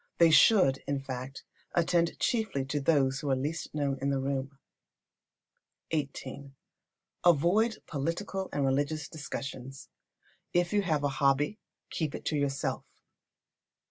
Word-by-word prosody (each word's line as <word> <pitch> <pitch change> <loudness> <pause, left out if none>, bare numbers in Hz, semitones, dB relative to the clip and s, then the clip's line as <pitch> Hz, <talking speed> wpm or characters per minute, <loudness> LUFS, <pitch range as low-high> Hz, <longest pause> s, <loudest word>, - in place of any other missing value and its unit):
They 165 -1 +6
should, 160 -8 +6
in 140 -1 0
fact, 135 0 -6 0.3
attend 170 0 +2
chiefly 220 - 0
to 145 +2 -2
those 135 -3 +2
who 145 - -3
are 135 - +3
the 130 - -3
least 155 +4 -3
known 140 -2 -1
in 140 - 0
the 135 -1 +1
room. 135 0 -3 1.4
xviii. 140 -2 -4 0.7
Avoid 175 +8 +3
political 170 +6 -3
and 140 -1 0
religious 145 +3 0
discussions. 135 -3 -7 0.6
If 175 +1 +2
you 205 - +4
have 155 -6 0
a 145 - +2
hobby, 140 +9 +2 0.3
keep 155 -3 -2
it - - -8
to 155 - 0
yourself. 140 -2 -1
145 Hz, 135 wpm, -30 LUFS, 135-170 Hz, 1.4 s, They